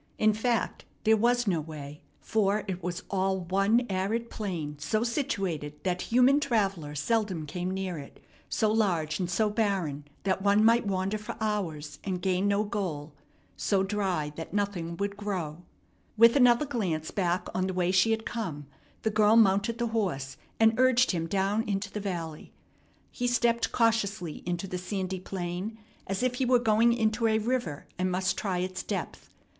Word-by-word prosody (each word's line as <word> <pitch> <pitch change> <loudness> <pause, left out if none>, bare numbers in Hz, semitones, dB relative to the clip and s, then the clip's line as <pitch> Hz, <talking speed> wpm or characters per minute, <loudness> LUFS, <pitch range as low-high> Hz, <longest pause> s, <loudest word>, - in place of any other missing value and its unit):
In 215 0 +4
fact, 225 0 -1 0.2
there 220 0 +5
was 240 +2 +2
no 175 -6 +1
way, 150 -1 -9 0.2
for 210 -1 +1
it 185 -1 -3
was 180 +1 -4
all 190 -1 +1
one 195 +7 +2
arid 205 +5 -1
plain 165 -8 -4
so 215 +10 0
situated 195 - -2
that 180 -1 -1
human 255 +4 +5
traveller 195 - 0
seldom 185 +1 0
came 180 +4 -3
near 190 -3 -3
it, 140 - -11 0.3
so 215 -2 +1
large 175 -8 +1
and 180 -2 -1
so 215 +5 +2
barren 195 -10 -1 0.2
that 190 -1 0
one 205 +2 +4
might 230 -1 +4
wander 195 +2 -1
for 210 - -7
hours 185 -9 -3
and 185 -2 -2
gain 185 +2 +1
no 200 +1 +2
goal, 175 -9 -4 0.4
so 195 -2 +1
dry 190 -7 -1
that 165 +4 -6
nothing 180 -5 -2
would 200 +1 -2
grow. 180 -6 -4 0.6
With 230 +1 +7
another 250 +1 +5
glance 185 - -2
back 180 -2 0
on 185 0 0
the 190 - -2
way 180 0 +1
she 190 +4 +4
had 225 0 0
come, 170 -11 -4 0.4
the 220 - +1
girl 210 +1 +4
mounted 215 +1 +4
the 235 0 -1
horse 140 -12 -1 0.2
and 225 0 +6
urged 255 0 +4
him 165 -3 -2
down 195 +4 +1
into 200 0 -2
the 210 - -4
valley. 170 -6 -5 0.6
He 245 - -2
stepped 235 -1 +2
cautiously 205 -8 0
into 175 +1 -2
the 180 -1 -4
sandy 185 0 -3
plain, 185 +3 -4 0.3
as 195 +5 -2
if 255 -1 +2
he - - +3
were 250 0 +5
going 230 0 +4
into 225 0 +1
a 220 0 +3
river 220 - -2
and 185 0 +1
must 185 +1 0
try 190 -3 -2
its 185 +1 -2
depth. - - -5
195 Hz, 170 wpm, -28 LUFS, 180-220 Hz, 0.6 s, With